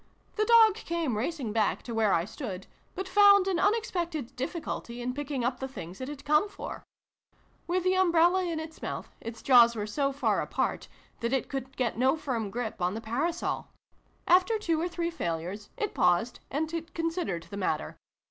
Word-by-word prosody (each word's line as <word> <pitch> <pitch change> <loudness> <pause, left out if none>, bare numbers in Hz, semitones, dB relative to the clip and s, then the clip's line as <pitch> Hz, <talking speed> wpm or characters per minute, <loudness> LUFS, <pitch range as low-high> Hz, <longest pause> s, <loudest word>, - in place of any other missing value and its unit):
The 430 - +1
dog 455 -2 +7
came 335 - -2
racing 250 -1 -2
back 220 -2 +1
to 235 - -6
where 220 -2 +2
I 170 -1 +2
stood, 200 -4 -6 0.3
but 380 +1 -4
found 400 0 +6
an 370 -3 +1
unexpected 350 - -1
difficulty 255 -3 -4
in 245 +1 -2
picking 280 -2 -3
'up 245 +1 -1
the 265 - -3
things 190 -6 -9
it 260 - -4
had 290 -1 -8
come 300 +8 +3
for. 395 - -7 0.8
With 360 +1 0
the 370 0 +3
umbrella 360 0 +4
in 335 -3 -2
its 315 0 -8
mouth, - - -5
its 230 0 -7
jaws 240 -3 +7
were 210 -2 -2
so 275 +6 0
far 280 +1 +1
apart - - -2 0.3
that 235 +2 -1
it 265 - 0
could 270 0 -5
get 240 -3 -1
no 265 +5 +3
firm 235 -8 -2
grip 225 -1 -4
on 180 +3 0
the - - -3
parasol. 280 +10 -2 0.6
After 370 +5 +5
two 335 -7 0
or 345 - 0
three 340 0 -2
failures, 180 - -4
it 420 - -2
paused 180 +7 +2
and 320 +3 -3
considered 330 - -2
the 200 - -5
matter. 155 - -2
280 Hz, 185 wpm, -29 LUFS, 230-345 Hz, 0.8 s, dog